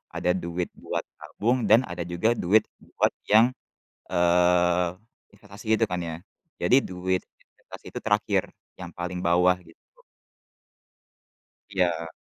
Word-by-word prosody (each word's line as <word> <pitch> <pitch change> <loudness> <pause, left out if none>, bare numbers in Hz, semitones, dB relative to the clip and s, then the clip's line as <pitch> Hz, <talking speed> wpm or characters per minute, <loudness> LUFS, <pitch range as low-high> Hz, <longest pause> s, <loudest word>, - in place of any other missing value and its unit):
ada 90 - +1
duit 85 0 -3
buat - - -4 0.2
tabung, 120 +1 -1
dan 115 +3 +7
ada 85 0 -5
juga 85 +7 +1
duit 105 +5 +3 0.2
buat - - 0 0.2
yang, 115 +4 +6 0.6
eee, 90 0 +3 0.5
investasi 105 +1 -14
itu 115 - +5
kan 90 - -2
ya, 80 -1 -5 0.4
jadi 130 - +4
duit 90 0 -2 0.2
investasi - - -15
itu - - -5
terakhir, 105 -2 +1 0.4
yang 90 -1 -7
paling 90 0 -4
bawah, 90 +1 +4
gitu. 85 -2 -19 1.9
Iya. 85 -4 0
90 Hz, 125 wpm, -26 LUFS, 85-105 Hz, 1.9 s, dan